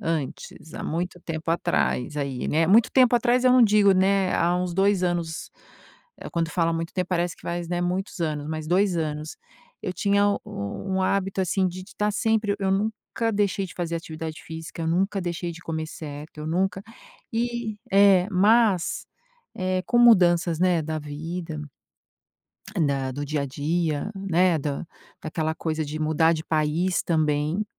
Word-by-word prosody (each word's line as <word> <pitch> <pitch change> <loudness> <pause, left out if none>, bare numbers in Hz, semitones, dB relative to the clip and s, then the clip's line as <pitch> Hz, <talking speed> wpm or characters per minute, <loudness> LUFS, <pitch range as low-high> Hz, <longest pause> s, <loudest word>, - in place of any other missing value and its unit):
antes, 160 0 -4
há - - -5
muito 180 +2 -3
tempo 165 -1 -4
atrás 70 - 0
aí, 140 -3 -3
né, 160 +2 +2
muito 220 +6 +5
tempo 250 -2 +5
atrás 245 +1 +3
eu 255 - +6
não 255 -1 +6
digo 210 -2 +5
né, 190 0 +2
há 175 +1 +2
uns 180 -1 -2
2 195 0 +2
anos. 170 -2 -2 0.8
Quando 165 -1 -1
fala 165 -1 +1
muito 165 0 -3
tempo, 180 -1 -2
parece 175 -1 -1
que - - -21
faz, 170 0 -4
né, 175 0 -1
muitos 185 +2 -2
anos, 150 -2 -2
mas 155 -1 -4
2 185 +2 +2
anos. 155 -1 -3 0.5
Eu 185 - -3
tinha 200 +2 +2
u 200 - 0 0.5
um 190 - +1
hábito 195 0 0
assim 190 +1 +1
de 185 +1 -7
tá 210 0 +1
sempre 215 -1 +1
eu 195 -1 0
nunca 220 +3 -1
deixei 200 -1 0
de 175 - -13
fazer 170 -1 -3
atividade 160 -1 -7
física, 160 +1 -7
eu 160 - -1
nunca 195 +4 +1
deixei 175 -1 -3
de 165 - -11
comer 160 -1 -3
certo, 150 0 -9
eu 150 - -5
nunca 185 +3 0 0.5
e 235 -2 -2
é, 195 -2 +6
mas, 205 -1 +3 0.5
eh, 185 0 -1
com 240 - +2
mudanças, 175 -8 +5
né, 180 -3 +3
da 155 +1 -3
vida 155 +2 -6 1.3
da 135 -2 -1
do 145 +2 -4
dia 150 0 -1
a - - -2
dia, 155 +5 -1
né, 185 -3 +2
da 145 +2 -3 0.4
daquela 160 0 -2
coisa 160 -1 -2
de 150 +2 -5
mudar 160 +1 +3
de 160 -1 -4
país 160 +4 +1
também, 155 +3 0
175 Hz, 170 wpm, -25 LUFS, 160-195 Hz, 1.3 s, eu